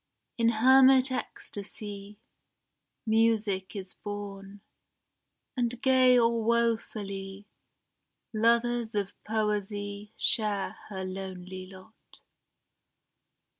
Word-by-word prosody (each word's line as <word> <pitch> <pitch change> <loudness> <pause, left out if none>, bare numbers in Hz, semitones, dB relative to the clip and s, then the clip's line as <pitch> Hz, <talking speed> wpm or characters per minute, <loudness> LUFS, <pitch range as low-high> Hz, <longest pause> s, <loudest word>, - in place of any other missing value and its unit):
In 230 -1 +3
hermit 260 +3 +6
ecstasy 205 -4 -5 0.9
Music 220 -4 +1
is 190 -2 -7
born, 200 -1 -8 0.9
and 245 -1 -1
gay 255 -1 +5
or 230 -1 +2
wofully 205 -4 -1 0.9
Lovers 235 0 +1
of 200 -1 -1
Poesy 210 -1 -2
share 210 -4 +1
her 190 -2 -5
lonely 185 0 -7
lot. 190 +3 -17
210 Hz, 75 wpm, -28 LUFS, 195-235 Hz, 0.9 s, hermit